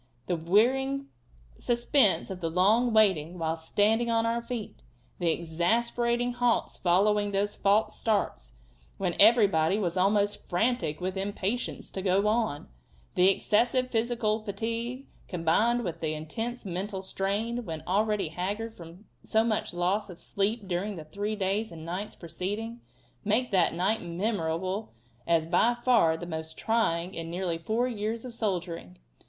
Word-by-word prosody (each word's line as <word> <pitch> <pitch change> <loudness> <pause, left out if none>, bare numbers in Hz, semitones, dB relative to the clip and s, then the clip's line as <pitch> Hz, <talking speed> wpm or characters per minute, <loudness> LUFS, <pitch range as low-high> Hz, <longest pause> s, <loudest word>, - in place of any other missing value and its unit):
The 175 - 0
wearing 265 +11 +2 0.5
suspense 240 -4 +2
of 185 -1 -6
the 165 - -1
long 210 +8 +3
waiting, 185 -6 +3
while 160 -1 -1
standing 210 +8 +1
on 230 0 +2
our 230 +1 0
feet; 235 - -6 0.4
the 170 - +1
exasperating 235 +9 0
halts 245 -1 +1
following 205 +3 +2
those 200 +1 -1
false 200 +2 +2
starts, 195 - -1 0.4
when 180 -3 -1
everybody 200 -6 +5
was 185 -4 -1
almost 205 +2 +1
frantic 195 -4 0
with 185 +1 -2
impatience 200 +4 -3
to 190 - -4
go 195 +1 +2
on; 215 -9 0 0.5
the 180 +1 +5
excessive 245 +6 +2
physical 225 -2 0
fatigue, 230 +5 -4 0.2
combined 210 +8 +2
with 170 -4 -4
the 155 -1 -1
intense 225 +11 -5
mental 190 +1 -4
strain 210 +6 -2
when 160 -6 -6
already 205 -1 +1
haggard 205 +7 -4
from 170 +4 -12 0.4
much 215 -2 -1
loss 185 +4 0
of 180 - -9
sleep 200 +3 -2
during 190 +3 -2
the 160 -3 -8
three 205 +7 -3
days 200 +2 -1
and 160 -1 -9
nights 185 +5 -5
preceding, 205 +7 -5 0.4
make 225 +4 +1
that 180 -4 +3
night 200 +6 +1
memorable 185 +1 -2 0.3
as 165 -1 +3
by 235 +8 +3
far 195 -11 +4
the 175 - -6
most 160 -1 -5
trying 190 -6 0
in 165 -2 -5
nearly 175 -1 -2
four 220 +8 0
years 225 0 -3
of 250 - -7
soldiering. 175 - -3
200 Hz, 145 wpm, -28 LUFS, 175-225 Hz, 0.5 s, everybody